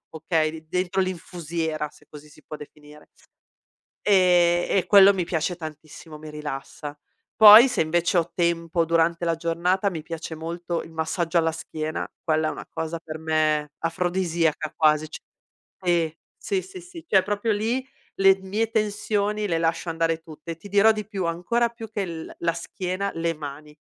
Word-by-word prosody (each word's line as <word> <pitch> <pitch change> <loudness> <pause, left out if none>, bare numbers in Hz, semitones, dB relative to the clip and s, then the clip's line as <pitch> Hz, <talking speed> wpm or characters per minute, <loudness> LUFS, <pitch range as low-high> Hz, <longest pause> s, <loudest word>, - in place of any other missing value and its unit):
okay, 160 0 0
li 160 0 -9
dentro 185 +1 0
l'infusiera, 165 -4 -3
se - - -22
così 150 0 -13
si 155 - -18
può 155 - -8
definire. 150 0 -14 1.0
Ehm, 175 -3 +4
e 190 - +1
quello 200 -1 +8
mi 180 - 0
piace 175 +1 -2
tantissimo, 155 -1 -10
mi 155 0 -9
rilassa. 150 0 -7 0.4
Poi, 220 +4 +10
se 250 - 0
invece 170 +3 +1
ho 170 +1 -3
tempo, 170 -1 0
durante 165 +1 +1
la 165 -1 +1
giornata 175 +4 0
mi 160 -5 -6
piace 165 0 -6
molto 170 +1 -4
il 165 - -13
massaggio 165 +2 -1
alla 165 0 +1
schiena, 155 -1 -5 0.2
quella 155 -1 +1
è - - -2
una - - -9
cosa 160 +1 -4
per 155 0 -6
me 155 -2 0
afrodisiaca 165 -2 -1
quasi, 155 0 +3
c - - -7 0.6
sì, 170 -4 +1 0.3
sì, 390 -2 -1
sì, 375 -1 -10
sì, 350 -2 -12
cioè 190 -1 +5
proprio 205 +3 -1
lì, 230 +5 -1 0.3
le 195 0 +6
mie 210 +4 -1
tensioni 210 -1 -1
le 165 -3 0
lascio 165 +1 -1
andare 165 0 0
tutte 160 0 -9
e 165 - -9
ti 200 +5 -12
dirò 205 +2 +5
di 215 -2 -1
più: 195 -4 -4
ancora 180 +8 0
più 230 -1 -10
che 210 -1 -4
il 170 -4 -5
la 170 -1 +1
schiena, 185 +3 -4
le 165 0 -1
mani, 150 0 -9
170 Hz, 170 wpm, -24 LUFS, 160-190 Hz, 1.0 s, Poi